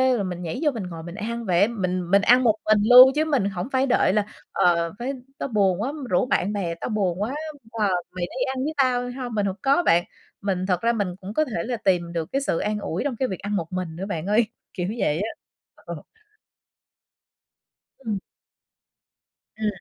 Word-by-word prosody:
rồi 205 - -1
mình 180 -1 -4
nhảy 165 -2 -4
vô 295 - +3
mình 225 -5 -5
ngồi 165 -3 -7
mình 170 +2 -8
ăn 230 +2 -4
vậy 180 -1 +2
á. 200 - +6
Mình 185 -6 -2
mình 200 0 +6
ăn 245 +4 +5
một 220 -3 +4
mình 215 -1 +4
luôn, 255 +1 +10
chứ 310 - +2
mình 280 -10 +1
hổng 190 +4 -4
phải 265 0 +2
đợi 245 -6 +3
là 210 -1 +2 0.3
"Ờ, 170 -2 +2
phải 260 +3 -2 0.2
tao - - -3
buồn 195 -4 +2
quá, 265 +6 -2 0.2
rủ 180 - +2
bạn 205 -4 0
bè, 175 -5 -2
tao 165 - -5
buồn 195 -4 0
quá, 245 +7 -1 0.4
ờ, 215 -3 0 0.2
mày 180 -1 -3
đi 255 +8 -3
ăn 260 - -2
với 305 +3 -2
tao 245 -2 +1
hông?". 245 -2 -5
Mình 205 - +1
hổng 190 -1 -1
có 280 +6 +3
bạn. 170 +1 +4 0.4
Mình 190 -2 -1
thật 180 -2 +1
ra 235 +1 +2
mình 200 -6 -2
cũng 195 +3 -7
có 310 - +2
thể 210 - -3
là 245 -1 -2
tìm 175 -5 0
được 165 -1 -3
cái 275 - 0
sự 220 -11 0
an 210 0 -1
ủi 185 -1 -3
trong 275 -3 -2
cái 260 +3 0
việc 190 - -5
ăn 205 +1 -3
một 170 -2 -3
mình 180 -3 -3
nữa 185 +3 -4
bạn 170 -5 -4
ơi. 215 +4 +3 0.3
Kiểu 180 -2 -2
vậy 155 -2 +1
á. 215 - -1 0.5
Ờ. - - -9 1.9
Ừm. 220 -6 -3 1.4
Ừm. 220 0 -2
205 Hz, 220 wpm, -24 LUFS, 180-240 Hz, 1.9 s, luôn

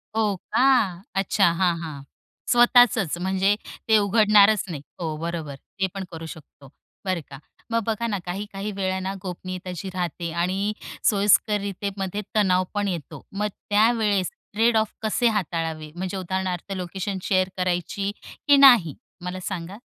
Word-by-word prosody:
हो 210 -3 +1
का. 210 -5 +2
अच्छा 195 -1 +3
हां, 175 0 +1
हां, 150 -4 -6 0.5
स्वतःचच 240 -7 +5
म्हणजे 190 +2 +1 0.3
ते 220 -1 +6
उघडणारच 210 0 +5
नाही. 150 -4 -5 0.2
हो, 160 -3 -3
बरोबर. 165 -3 -4
ते 190 +7 -4
पण 195 -1 -4
करू 165 0 -7
शकतो 145 -3 -12 0.4
बरं 185 -3 -1
का. 135 - -9 0.3
मग 230 -1 +1
बघा 225 +1 -1
ना 205 -3 -1
काही-काही 200 +2 -5
वेळ 190 -1 -1
ना 190 +1 -3
गोपनीयता 185 0 -6
जी 190 +3 -5
राहते 175 -2 -3
आणि 185 +5 -1 0.4
सोयीस्कररितेमध्ये 200 -1 +1
तणाव 185 -3 +3
पण 205 -1 0
येतो. 170 -6 -5
मग 210 +2 -1 0.2
त्यावेळेस 210 -4 +2 0.2
ट्रेड 225 +2 +3
ऑफ 220 -1 0
कसे 220 +2 +1
हाताळावे 165 -6 -2
म्हणजे 185 +2 -4
उदाहरणार्थ 185 0 -3
लोकेशन 190 +2 -4
शेअर 185 -1 +2
करायची 185 +2 -1 0.4
की 285 -1 +7
नाही 240 - +7 0.3
मला 180 +1 -4
सांगा? 190 +3 -6
190 Hz, 140 wpm, -24 LUFS, 175-210 Hz, 0.5 s, की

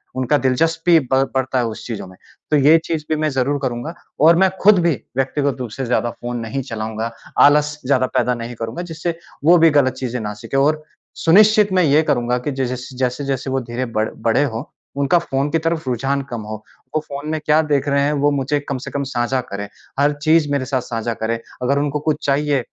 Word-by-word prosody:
उनका 130 +3 +2
दिलचस्पी 165 +6 +2
ब 135 0 +1
बढ़ता 130 0 0
है 120 - +1
उस 110 -2 -6
चीज़ों 110 -5 -5
में। 95 - -15 0.3
तो 150 - +5
ये 150 +4 +6
चीज़ 155 -2 -3
भी 155 - +2
मैं 155 - +2
ज़रूर 135 +2 0
करूँगा। 125 +5 -3 0.3
और 165 +3 +6
मैं 190 0 +4
खुद 200 -1 +6
भी 170 -2 +2 0.2
व्यक्तिगत 135 +1 0
रूप 125 -3 -4
से 135 +2 -4
ज़्यादा 120 0 0
फ़ोन 120 0 -6
नहीं 115 +4 -3
चलाऊँगा। 110 +1 -3 0.3
आलस 150 +1 +4
ज़्यादा 130 -1 +2
पैदा 125 - +2
नहीं 120 +1 -6
करूँगा। 115 +8 -5
जिससे 165 +1 -3 0.3
वो 175 +2 +7
भी 165 0 +6
गलत 130 -1 +2
चीज़ें 125 -1 -4
ना 105 -1 -4
सीखें। 135 - -3
और 155 +2 +2 0.3
सुनिश्चित 210 +3 +5
मैं 185 -1 +4
ये 150 +1 +4
करूँगा 120 -4 +1
कि 135 +4 -3
जिस-जिस 130 -1 -3
जैसे-जैसे 135 +1 -2
वो 135 - +1
धीरे 120 +2 -4
बड़ 110 -2 -1 0.2
बड़े 115 +5 +3
हों, 115 -3 -3 0.4
उनका 140 +5 +3
फ़ोन 140 -3 -2
की 165 - +2
तरफ 165 -3 -2
रुझान 135 +3 0
कम 115 - -4
हो। 110 - -3 0.4
वो - - +3
फ़ोन 140 +2 -6
में 155 - -1
क्या 155 +1 +4
देख 140 0 +1
रहे 140 0 +2
हैं 145 +1 +1
वो 145 - +4
मुझे 140 +1 0
कम 140 - -1
से - - -7
कम 140 - -2
साझा 120 +2 0
करें। 100 0 -4 0.3
हर 145 +1 +3
चीज़ 155 -2 +3
मेरे 140 -2 0
साथ 130 -1 -1
साझा 115 0 -3
करें। 115 +1 0 0.3
अगर 140 +3 +2
उनको 145 0 -1
कुछ 150 - -2
चाहिए 140 -1 +1
135 Hz, 215 wpm, -19 LUFS, 125-150 Hz, 0.4 s, वो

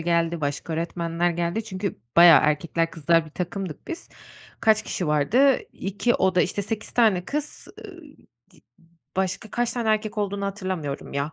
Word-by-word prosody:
geldi, 170 0 0
başka 145 +3 -3
öğretmenler 170 +1 -1
geldi. 175 +6 -2
Çünkü 195 -2 -4 0.2
bayağı... 170 -2 +9
Erkekler, 165 +2 0
kızlar 165 +1 +2
bir - - -13
takımdık 180 -1 -5
biz. 335 - -5 0.5
Kaç 220 -1 +4
kişi 180 - -3
vardı? 230 - +3
2 200 +5 -1
oda, 185 -1 +2
işte, 200 +2 -2
8 215 +1 -5
tane 210 -7 +3
kız, 300 +5 -5 0.2
ııı, 360 -3 -12 0.5
di - - -22 0.6
başka 190 +3 -2
kaç 240 +1 -1
tane 235 -3 -2
erkek 215 0 0
olduğunu 200 -1 -2
hatırlamıyorum 185 -8 -4
ya. 140 +3 -2
185 Hz, 155 wpm, -24 LUFS, 165-215 Hz, 0.6 s, bayağı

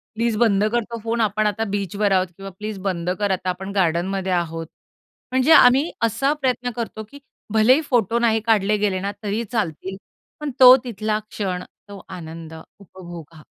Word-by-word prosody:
"Please 230 0 0
बंद 205 -3 +3
कर 240 0 +1
तो 230 +1 -7
फोन 230 +1 -1
आपण 215 0 +1
आता 210 +2 -1
बीचवर 200 +1 -1
आहोत." 185 -2 +1
किंवा 195 +3 -9
"प्लीज 210 +2 -7
बंद 175 -2 -2
कर 205 -2 0
आता 185 0 -1
आपण 190 +2 -4
गार्डनमध्ये 185 +1 0
आहोत." 165 -2 -2 0.6
म्हणजे 260 +4 +2
आम्ही 270 +3 +6
असा 230 +6 +1
प्रयत्न 250 -2 0
करतो, 225 -2 -5
की 250 +7 -14 0.3
भलेही 245 +7 +5
फोटो 235 - +1
नाही 225 -2 +2
काढले 210 -2 +2
गेले 200 -2 0
ना 200 +2 -3
तरी 210 +3 -2
चालतील, 190 -4 -3 0.4
पण 300 -1 -4
तो 255 -1 +10
तिथला 215 -3 -2
क्षण 185 -3 -3 0.3
तो 200 -2 -10
आनंद 165 -3 -9 0.3
उपभोगा. 170 -4 -12
205 Hz, 170 wpm, -22 LUFS, 185-230 Hz, 0.6 s, तो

